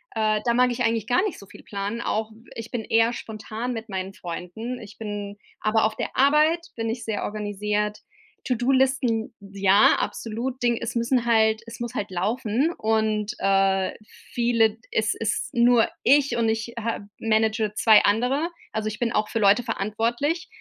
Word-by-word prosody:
Äh, 215 -1 +2
da 235 - +3
mag 250 +1 +3
ich 240 - -2
eigentlich 225 -2 +1
gar 250 - +3
nicht 415 - -3
so 200 - -12
viel - - -15
planen. 205 +3 -4
Auch 220 -1 -2
w 225 +3 -18
ich 230 0 -7
bin 240 -3 -3
eher 225 +1 +3
spontan 220 +2 -5
mit 225 0 -7
meinen 190 0 -4
Freunden. 195 +7 -6
Ich 215 -1 -12
bin 205 -2 -6 0.2
aber 220 +1 +2
auf 220 - -1
der - - -4
Arbeit 305 +5 +3
bin 225 0 -2
ich 235 +2 -4
sehr 215 -2 -3
organisiert. 210 0 -2 0.5
To-do-Listen? 255 -2 +1
Ja, 200 0 +4
absolut! 245 +3 -4
Ding 240 -1 +2
es 235 - -4
müssen 235 +1 +1
halt 220 -1 +3
es 230 - -9
muss 240 -1 -4
halt 205 - -3
laufen 220 - 0
und, 220 -1 0
äh, 195 -1 +2 0.4
viele 235 -2 +3
d 215 - -19
es 220 0 +1
ist 220 -2 -2
nur 240 -1 +4
ich 280 0 +4
und 230 -1 +2
ich 225 +1 -2
ha 230 0 -2 0.2
manage 220 -1 +1
2 215 -1 +6
andere, 250 +10 +1 0.2
also 215 0 -2
ich 215 0 -4
bin 235 -1 0
auch 210 -2 +1
für 230 - -1
Leute 205 +3 +4
verantwortlich 235 - -1
225 Hz, 180 wpm, -24 LUFS, 210-240 Hz, 0.5 s, 2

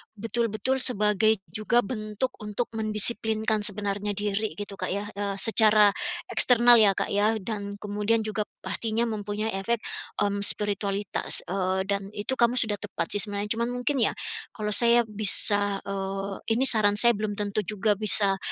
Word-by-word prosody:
betul-betul 230 +3 -2
sebagai 215 -4 +2
juga 215 +6 0
bentuk 215 +2 -4
untuk 210 +2 -5
mendisiplinkan 220 0 +2
sebenarnya 205 0 -2
diri 205 -1 -2
gitu 200 +2 -8
Kak 185 - -4
ya, 200 +1 -5
eee, 200 -1 -3
secara 215 -2 +5 0.4
eksternal 240 -1 +6
ya 210 -3 +5
Kak - - -3
ya 205 +2 +1
dan 200 0 -6
kemudian 210 +2 -1
juga 215 -1 -3 0.2
pastinya 230 +1 -1
mempunyai 210 0 -4
efek, 225 +4 -2 0.4
mmm, 200 0 +1
spiritualitas, 205 -1 0
eee, 190 0 -2
dan 200 0 -1
itu 235 +6 -4
kamu 235 0 +2
sudah 215 -3 -2
tepat 200 -5 -5
sih - - +1
sebenarnya 205 0 -5
cuman 235 +1 -2
mungkin 250 +3 -2
ya, - - 0 0.4
kalau 210 -1 -5
saya 235 +2 +4
bisa, 205 -1 +3
eee, 195 0 -5 0.2
ini 255 +4 0
saran 210 -3 +2
saya 235 +2 +5
belum 210 0 -4
tentu 205 0 -3
juga 210 0 -1
bisa 205 -2 +3
210 Hz, 150 wpm, -25 LUFS, 200-220 Hz, 0.4 s, eksternal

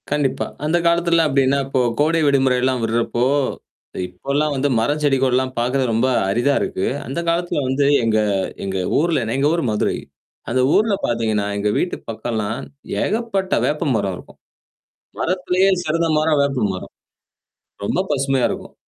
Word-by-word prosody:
கண்டிப்பா. 140 -2 0 0.2
அந்த 160 +3 +2
காலத்துலாம் 170 -1 +3
அப்டின்னா, 135 0 +2
இப்போ 135 -1 +1 0.2
கோடை 160 +2 +2
விடுமுறைெல்லாம் 130 -2 +2
விடுறப்போ 115 +2 0 0.8
இப்போலாம் 140 +11 -1
வந்து 140 +2 0
மரம் 145 +7 0
செடிகோள்லாம் 130 -2 +2
பாக்கர்து 125 +3 +1
ரொம்ப 115 +3 +2 0.2
அரிதா 120 +8 +2
இருக்கு. 95 - -2 0.2
அந்த 135 +6 -3
காலத்துல 170 -2 0
வந்து 135 +2 +1 0.2
எங்க 110 -1 +2 0.4
எங்க, 95 -1 -3 0.2
ஊர்ல 160 -4 +1
எங்க 140 +2 +2
ஊர் 170 -1 0
மதுரை, 105 -1 0 0.5
அந்த 130 +2 +1
ஊர்ல 215 0 +3
பாத்தீங்கன்னா, 110 -3 0
எங்க 105 +1 0
வீட்டுக்கு 180 - -2
பக்கம்லாம் 110 -2 -3 0.4
ஏகப்பட்ட 205 -3 -1
வேப்ப 150 +1 0
மரம் 100 -3 -2
இருக்கும். - - -15 0.8
மரத்திலேயே 185 +1 +1
சிறந்த 165 +1 0
மரம் 155 -1 +2
வேப்ப 135 -5 0
மரம். 95 - -8 0.9
ரொம்ப 140 - 0
பசுமையா 135 -2 +1
இருக்கும். - - -7
135 Hz, 135 wpm, -20 LUFS, 120-160 Hz, 0.9 s, காலத்துலாம்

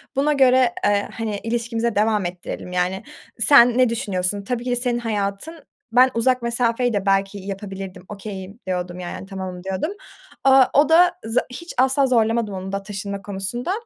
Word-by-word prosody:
buna 290 +3 +2
göre, 255 -3 +4
eee, 205 0 +1
hani, 220 -2 -3
ilişkimize 230 0 -2
devam 210 -1 +2
ettirelim, 175 0 -6
yani. 180 +1 -1 0.4
Sen 240 -1 +6
ne 255 -2 +4
düşünüyorsun? 200 -3 -2
Tabii 240 +3 -3
ki 250 - -2
de - - +2
senin 245 -1 -1
hayatın, 220 +8 -3 0.3
ben 255 +2 +6
uzak 250 +2 +1
mesafeyi 235 0 0
de 200 -1 -1
belki 195 +1 +1
yapabilirdim, 195 -1 -7
okay'im" 200 0 -8
diyordum, 180 -1 -3
yani, 180 +1 -6
tamamım 190 -2 -7
diyordum. 190 - -2 0.5
Aaa, 270 -1 +7
o 290 +2 +4
da 350 +2 +6
za 225 +2 +1
hiç 340 +7 -8
asla 265 +2 +3
zorlamadım 225 -3 +1
onu 190 0 -6
da 195 0 -3
taşınma 200 0 -5
konusunda. 205 - -3
220 Hz, 165 wpm, -22 LUFS, 195-245 Hz, 0.5 s, Aaa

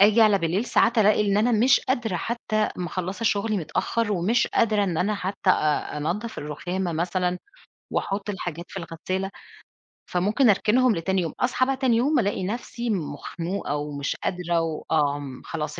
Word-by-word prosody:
آجي 210 +3 +6
على 210 -2 +5
بالليل، 180 +5 0
ساعات 240 -1 +3
ألاقي 210 0 +5
إن 200 0 +2
أنا 230 +4 +3
مش 240 +4 +5
قادرة 240 -7 -1
حتى 215 +1 -1
مخلصة 185 +4 -4
شغلي 215 0 +1
متأخر، 205 +6 -1
ومش 205 +7 +2
قادرة 215 -3 +2
إن 175 -4 -1
أنا 210 +3 +1
حتى 195 -1 0
أ 150 -3 +1
أنضّف 195 +10 -3
الرخامة 175 +5 -3
مثلًا 180 +2 -1 0.5
وأحط 200 +1 -2
الحاجات 175 -4 -5
في - - -12
الغسالة، 185 +4 -4 0.8
فممكن 210 +8 +2
أركنهم 220 +4 +3
لتاني 190 +3 0
يوم، 165 -3 -3
أصحى 255 +1 +2
بقى 270 0 -1
تاني 255 -4 +2
يوم، 280 +4 +3
ألاقي 200 -4 0
نفْسي 235 +3 -4
مخنوقة 165 -1 -3
ومش 145 -1 -3
قادرة 175 -2 0
وآمم 145 -4 -1
خلاص 150 -2 -4
195 Hz, 155 wpm, -25 LUFS, 170-220 Hz, 0.8 s, آجي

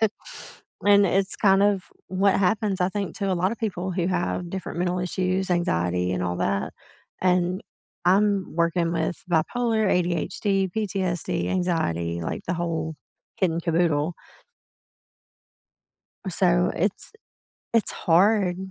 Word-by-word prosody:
then 220 -2 +3 0.8
and 200 -1 +6
it's 190 +2 0
kind 195 -1 +4
of 200 -2 +2 0.2
what 190 +1 +2
happens, 200 0 +1
I 180 - +3
think, 200 -1 -4
to 195 -2 -1
a - - +2
lotta 185 +6 0
people 190 -5 -3
who 175 -1 -1
have 180 -1 -1
different 185 -2 -5
mental 180 0 0
issues 185 +1 -1
anxiety, 90 - 0
and 90 - -1
all 90 -1 -1
that, 100 0 -1 0.5
and 180 0 +1 0.5
I'm 200 -1 +2
working 170 0 +1
with 165 +1 -2
bipolar, 220 +7 +1
ADHD, 185 +2 0
PTSD, 190 -5 -1
anxiety, 85 - -1
like, - - -4
the 175 - 0
whole 160 -2 -2 0.4
kit 185 -3 +2
and 165 +1 -3
caboodle. 165 -1 +1 2.1
So - - +2
it's - - -2 0.6
it's 225 - +3
hard. 185 +1 +3
180 Hz, 130 wpm, -25 LUFS, 170-195 Hz, 2.1 s, and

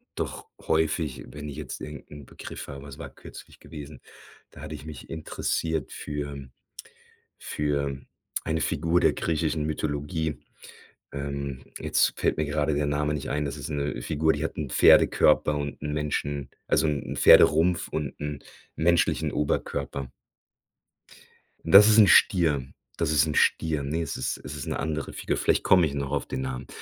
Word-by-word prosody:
doch - - -5
häufig 80 -4 0
wenn 75 0 -8
ich 70 - -8
jetzt - - -6
irgend 75 -4 -8
'n 75 -1 -10
Begriff - - -9
habe 70 -1 -8
was 70 -1 -10
war - - -7
kürzlich - - -13
gewesen? 75 -2 -10 0.5
Da - - -13
hatte 75 0 -7
ich 75 - -10
mich 80 -2 -9
interessiert 80 -1 -2
für 70 -2 -6 0.9
für 70 -2 -2 0.4
eine 80 -1 -1
Figur 85 +3 +1
der - - +3
griechischen 80 -1 -1
Mythologie. 75 0 -2 0.7
Ähm, 70 -1 -5 0.2
jetzt - - +1
fällt - - +1
mir 75 - +1
gerade 75 0 0
der 75 0 0
Name 75 +1 0
nicht 75 - -4
ein. 75 +1 -1
Das 70 0 -4
ist 75 - -6
'ne 70 -3 -2
Figur, 80 +4 +1
die 75 +2 -3
hat - - -4
'n 75 -4 -3
Pferdekörper 75 +4 +5
und 70 -1 -5
'n 75 0 -3
Menschen 75 -2 -2 0.2
also 80 - +3
'n 75 -2 -2
Pferderumpf 85 +3 +6
und 75 -4 -4
'n 75 -1 -4 0.4
menschlichen 85 +2 +2
Oberkörper. 70 -2 -2 1.6
Das 100 +6 +9
ist 110 - +5
'n 105 -2 +8
Stier. 80 -7 +4 0.3
Das 75 - 0
ist 75 -1 +4
'n 75 - -3
Stier. 80 -3 +2
Ne, 75 +4 -2
es 80 - -4
ist - - -2
es 75 - -7
ist 70 - -6
'ne - - -2
andere 75 0 -3
Figur. - - -2
Vielleicht - - +1
komme 90 -3 +5
ich 70 - -3
noch 70 -1 -3
auf 70 - -1
den 65 - -4
Namen. 65 -1 -5
75 Hz, 170 wpm, -26 LUFS, 70-80 Hz, 1.6 s, Das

